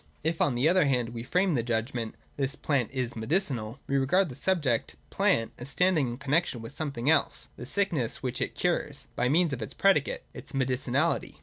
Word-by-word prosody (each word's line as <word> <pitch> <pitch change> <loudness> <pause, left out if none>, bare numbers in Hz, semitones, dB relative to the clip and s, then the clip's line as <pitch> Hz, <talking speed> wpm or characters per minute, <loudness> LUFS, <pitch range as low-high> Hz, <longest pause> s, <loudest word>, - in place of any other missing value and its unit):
If, 160 +1 0
on 135 - +2
the 125 +5 +3
other 180 -1 +5
hand, 125 -4 +1
we 115 -1 -6
frame 180 +8 +1
the 125 - +2
judgment, 115 0 -2
' - - -34
This 135 0 -1
plant 140 -7 0
is 130 -3 -2
medicinal,' 120 - -1
we 140 - 0
regard 165 +7 +3
the 125 - -8
subject, 145 -11 0 0.2
plant, 115 0 +2
as 125 +3 -7
standing 170 -2 +2
in 120 0 -4
connexion 140 0 0
with 115 0 -8
something 140 -5 -3
else 155 -2 +2
(the 120 - -8
sickness 170 - 0
which 125 -1 -2
it - - -2
cures), 170 -5 -1
by 125 +1 +1
means 165 +1 +3
of 125 - -4
its 110 - -5
predicate 190 -8 +2
(its - - -11
medicinahty). 130 +3 0
135 Hz, 200 wpm, -28 LUFS, 120-160 Hz, 0.2 s, other